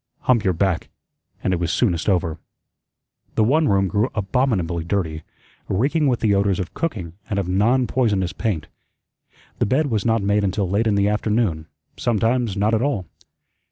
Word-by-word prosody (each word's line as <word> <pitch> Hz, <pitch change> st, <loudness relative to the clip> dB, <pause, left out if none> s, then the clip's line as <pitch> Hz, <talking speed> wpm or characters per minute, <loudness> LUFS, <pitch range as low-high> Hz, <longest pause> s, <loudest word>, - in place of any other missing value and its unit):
Hump 120 Hz, -4 st, +2 dB
your 95 Hz, -3 st, +2 dB
back, 90 Hz, 0 st, 0 dB, 0.5 s
and 95 Hz, -, +1 dB
it 90 Hz, -, 0 dB
was 85 Hz, -1 st, -1 dB
soonest 90 Hz, -6 st, +1 dB
over. 85 Hz, -4 st, 0 dB, 1.0 s
The 110 Hz, -, +3 dB
one 150 Hz, +8 st, +3 dB
room 95 Hz, -1 st, +2 dB
grew 105 Hz, +6 st, +1 dB
abominably 100 Hz, -6 st, 0 dB
dirty, 80 Hz, -3 st, -2 dB, 0.5 s
reeking 145 Hz, -, +1 dB
with 125 Hz, -3 st, +1 dB
the 110 Hz, -3 st, +3 dB
odors 100 Hz, -1 st, +1 dB
of 90 Hz, -3 st, -4 dB
cooking 100 Hz, -, -3 dB, 0.2 s
and 100 Hz, -, -1 dB
of 100 Hz, -3 st, -1 dB
"non 115 Hz, +8 st, +2 dB
poisonous" 100 Hz, -8 st, 0 dB
paint. 100 Hz, -8 st, -2 dB, 0.9 s
The -, -, +2 dB
bed 140 Hz, +4 st, +1 dB
was 105 Hz, -3 st, 0 dB
not 115 Hz, -2 st, +1 dB
made 100 Hz, +1 st, +2 dB
until 95 Hz, 0 st, 0 dB
late 105 Hz, +5 st, +1 dB
in 105 Hz, -, +2 dB
the 100 Hz, 0 st, +2 dB
afternoon, 105 Hz, -6 st, 0 dB, 0.3 s
sometimes 115 Hz, -1 st, 0 dB
not 105 Hz, +3 st, +2 dB
at 110 Hz, -, +2 dB
all. 120 Hz, -9 st, -1 dB
100 Hz, 170 wpm, -22 LUFS, 95-115 Hz, 1.0 s, The